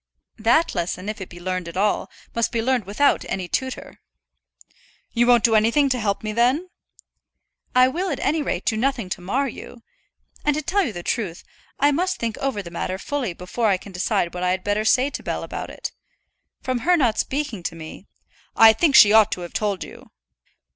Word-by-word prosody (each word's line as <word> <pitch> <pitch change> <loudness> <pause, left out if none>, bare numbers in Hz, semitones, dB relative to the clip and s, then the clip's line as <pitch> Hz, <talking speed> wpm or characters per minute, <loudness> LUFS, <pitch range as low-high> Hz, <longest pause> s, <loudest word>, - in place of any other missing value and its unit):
"That 240 +10 +3
lesson, 180 +1 -3
if 215 -1 -5
it 190 - -7
be 175 - -11
learned 185 0 -3
at 170 - -7
all, 205 +2 +1 0.2
must 230 -1 0
be 235 - -1
learned 245 -2 0
without 280 +8 +2
any 185 -2 -3
tutor." 260 +8 -4 1.1
"You 240 0 +2
won't 240 -2 +5
do 230 - +4
anything 230 +7 +3
to 255 -1 0
help 200 -2 -1
me 215 0 -3
then?" 260 +11 +1 1.0
"I 255 0 +6
will, 350 +8 -2
at 285 - -3
any 310 +2 0
rate, 200 -10 -3
do 220 - +1
nothing 235 -4 -1
to 180 - -4
mar 260 +10 -1
you. 235 -1 -10 0.6
And, 295 -1 +2
to 305 - -2
tell 365 - +1
the 175 -4 -7
truth, 190 -7 -3 0.4
I 285 +2 +4
must 365 +6 0
think 230 -1 -3
over 260 -7 -2
the 170 - -10
matter 185 +2 -3
fully 250 -2 -3
before 185 +7 -2
I 195 -3 +3
can 200 - -12
decide 180 -1 -1
what 180 - -5
I 180 - +1
had 185 0 -1
better 205 +1 0
say 260 +5 +3
to - - -6
Bell - - -3
about - - -6
it. - - -6 0.7
From 255 -1 -1
her 355 +8 +3
not 240 -8 +1
speaking 275 -8 -2
to 170 - -4
me 160 +4 -10 0.3
" - - -31
"I 225 0 +8
think 285 +4 +2
she 210 0 +8
ought 220 -1 +6
to 180 - -5
have 175 - -8
told 205 -3 -1
you." - - -13
225 Hz, 210 wpm, -22 LUFS, 190-270 Hz, 1.1 s, I